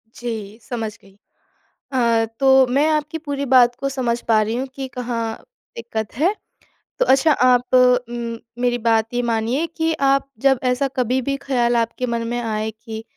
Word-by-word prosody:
जी 220 -3 -6
समझ 225 -3 -4
गई। 195 0 -21 0.8
अ, 235 -3 +2
तो 265 -1 +6
मैं 275 +5 +2
आपकी 305 +1 -1
पूरी 280 0 -2
बात 245 -1 +6
को 275 - -1
समझ 245 -3 -1
पा 220 -2 +4
रही 215 +2 -1
हूँ 260 +2 -2
कि 270 -1 -5
कहाँ 230 -2 -3 0.4
दिक़्क़त 220 -2 -5
है। 340 +8 +2 0.7
तो - - +3
अच्छा 275 +4 +4
आप 250 -1 +2
उम, 240 -2 +2 0.2
मेरी 245 -1 +1
बात 225 0 +2
ये 245 - +1
मानिए 235 +5 0
कि 325 0 +1 0.2
आप 275 0 +1
जब 270 -2 +3
ऐसा 255 +2 +1
कभी 255 0 0
भी 275 +2 -2
ख़्याल 245 -3 0
आपके 235 +2 -1
मन 230 -1 -2
में 240 +1 -2
आए 220 -1 -2
कि 220 0 -9
245 Hz, 175 wpm, -20 LUFS, 230-265 Hz, 0.8 s, तो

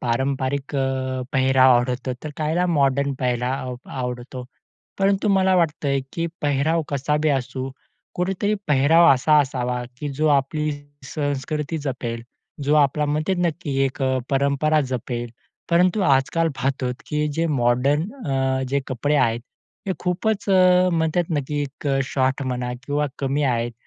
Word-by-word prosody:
पारंपरिक 135 +3 -1
अ, 130 -1 -1
पेहराव 130 -1 +5
आवडतो, 125 +1 -1
तर 155 - -4
काहीला 160 +3 0
मॉडर्न 140 -4 +2
पेहराव 125 +1 -1
आव 125 - -5 0.2
आवडतो. 125 +1 -5 0.5
परंतु 195 +2 +2
मला 190 -1 +3
वाटतंय, 150 -5 +1
की 165 0 -2 0.2
पेहराव 150 +3 +1
कसाबी 150 +2 0
असू, 135 -1 -2 0.4
कुठेतरी 195 +3 0
पेहराव 150 +5 +5
असा 150 +4 +4
असावा, 125 -3 -2 0.2
की 150 - -4
जो 155 - +2
आपली 150 +3 -2 0.4
संस्कृती 150 +1 -2
जपेल, 125 -5 -4 0.4
जो 145 +2 +3
आपला 150 0 +3
मते 155 +5 0
नक्की 155 -3 -4
एक 135 +1 -3
अ, 130 0 +1
परंपरा 140 +3 +2
जपेल. 120 -1 -3 0.4
परंतु 180 +4 +3
आजकाल 145 +4 +2
पाहतोत, 130 -2 -1
की 150 0 -1
जे 165 +3 0
मॉडर्न 135 +1 +2 0.2
अ, 135 -1 0
जे 140 +2 +1
कपडे 145 +4 0
आहेत 115 -4 +2 0.5
ते 190 - 0
खूपच 195 +4 -1
अ, 185 -1 +5
म्हणतात 165 +1 +1
नक्की 145 +1 -2
एक 140 +1 -5 0.2
शॉट 130 +1 0
म्हणा 125 -1 -2
किंवा 145 +1 0
कमी 140 +1 0
आहेत. 120 -2 0
140 Hz, 140 wpm, -22 LUFS, 130-155 Hz, 0.5 s, पेहराव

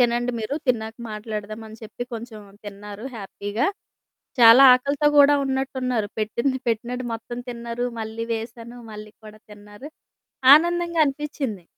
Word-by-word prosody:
తినండి 240 0 +2
మీరు, 225 +5 -3
తిన్నాక 225 -2 0 0.2
మాట్లాడదామని 215 +1 -7
చెప్పి, 220 +2 -7
కొంచుం 225 -1 -7 0.2
తిన్నారు 205 +2 -9
హ్యాపీగా. 205 +4 -3 0.7
చాలా 235 +2 +9
ఆకలితో 280 +3 +1
గూడా 290 0 +7
ఉన్నట్టున్నారు. 260 -4 -2
పెట్టింది 235 +5 -1
పెట్టినట్టు 240 +3 -2
మొత్తం 240 +2 -7
తిన్నారు, 235 0 -4 0.2
మళ్ళీ 220 +1 -5
వేశాను 230 +1 -8
మళ్ళీ 215 0 -10
కూడా 215 0 -12
తిన్నారు, 205 +6 -12 0.6
ఆనందంగా 340 +2 +3
అనిపిచ్చింది. 275 - -4
235 Hz, 115 wpm, -23 LUFS, 215-260 Hz, 0.7 s, చాలా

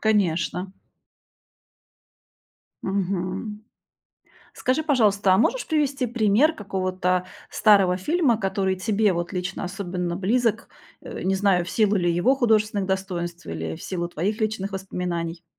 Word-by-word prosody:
Конечно. 185 -3 0 2.1
Мгм. 195 +2 -2 1.1
Скажи, 260 +5 +2
пожалуйста, 210 -10 +3
а - - +3
можешь - - +1
привести 285 -5 +1
пример 235 +6 +3
какого-то 185 - -1 0.2
старого 195 -4 +4
фильма, 290 - +2
который 195 -2 0
тебе 205 +2 +1
вот 175 +1 -3
лично 180 0 -3
особенно 180 -2 -3
близок, 225 +3 0 0.3
э, - - -7
не 190 +1 +1
знаю, 190 -3 +2
в 175 - -7
силу 215 -2 +2
ли 175 -3 +2
его 175 +11 +3
художественных 215 -5 +1
достоинств 180 -3 -3
или 80 0 -4
в - - -12
силу 175 -2 -3
твоих 195 +7 -2
личных 215 -2 -2
воспоминаний? 175 -3 -4
195 Hz, 125 wpm, -24 LUFS, 180-220 Hz, 2.1 s, старого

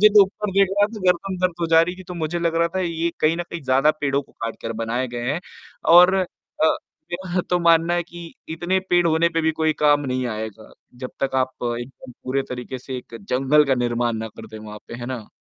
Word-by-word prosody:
मुझे 215 - +9
तो 210 -1 +7
ऊपर 200 +1 -5
देख 195 0 +4
रहा 205 - +5
था, 215 0 -9
गर्दन 185 +2 +1
दर्द 185 -2 +1
हो 170 - +1
जा 165 0 +6
रही 180 +2 -2
थी - - -8
तो 180 - -5
मुझे 165 0 -2
लग 170 -1 0
रहा 170 0 +3
था - - +1
ये 170 -1 -1
कहीं 155 +2 +3
न 175 - -2
कहीं 170 - -5
ज़्यादा 135 +3 +4
पेड़ों 140 -1 +1
को - - -25
काटकर 115 0 -5
बनाए 120 +3 -1
गए 120 +1 -3
हैं 160 - -2 0.6
और 180 +2 +8
अ, 190 -1 +2 0.9
मेरा 180 0 -1
तो 180 - +3
मानना 170 0 +4
है 175 - +1
कि 175 0 -10 0.2
इतने 175 +4 0
पेड़ 175 -1 +4
होने 165 +1 +3
पे 165 0 -1
भी 160 - +3
कोई 160 -1 +3
काम 145 -1 +5
नहीं 130 0 -1
आएगा, 110 -1 -6 0.2
जब 125 +1 -7
तक 135 - -3
आप 130 - -20 0.3
एकदम 125 +1 -10
पूरे 135 +1 0
तरीके 125 +1 -5
से 130 +1 -6
एक 115 - -10
जंगल 135 +8 +3
का 135 - +3
निर्माण 120 -1 0
ना 110 0 -4
कर 110 - -11
दें 110 0 -10
वहाँ 105 0 -9
पे, - - -7
है 120 0 -6
ना? 125 -5 -5
155 Hz, 240 wpm, -22 LUFS, 125-175 Hz, 0.9 s, मुझे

